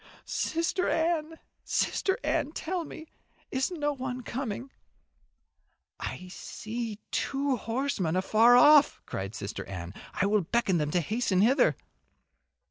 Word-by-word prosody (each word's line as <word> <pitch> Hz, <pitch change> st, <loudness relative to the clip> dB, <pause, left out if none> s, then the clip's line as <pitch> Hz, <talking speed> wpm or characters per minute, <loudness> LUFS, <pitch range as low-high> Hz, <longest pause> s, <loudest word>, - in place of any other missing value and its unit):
"Sister 335 Hz, +3 st, 0 dB
Anne, 325 Hz, -1 st, 0 dB, 0.3 s
Sister 385 Hz, -, 0 dB
Anne, 295 Hz, +2 st, 0 dB
tell 345 Hz, +1 st, -3 dB
me 315 Hz, -, -9 dB, 0.5 s
is 260 Hz, 0 st, 0 dB
no 295 Hz, -5 st, -1 dB
one 255 Hz, -2 st, -5 dB
coming?" 255 Hz, +1 st, -4 dB, 1.3 s
"I 185 Hz, -, -5 dB
see 220 Hz, +3 st, -5 dB
two 275 Hz, 0 st, 0 dB
horsemen 230 Hz, -, -1 dB
afar 220 Hz, +6 st, +5 dB
off," 295 Hz, +3 st, +7 dB
cried 95 Hz, +3 st, -5 dB
Sister 100 Hz, +1 st, -5 dB
Anne. 90 Hz, -2 st, -7 dB, 0.2 s
"I -, -, +1 dB
will 210 Hz, +1 st, +3 dB
beckon 195 Hz, 0 st, +1 dB
to -, -, 0 dB
them 150 Hz, -1 st, -1 dB
to 175 Hz, -, +3 dB
hasten 210 Hz, -, +1 dB
hither." 250 Hz, +7 st, +4 dB
245 Hz, 125 wpm, -29 LUFS, 190-290 Hz, 1.3 s, off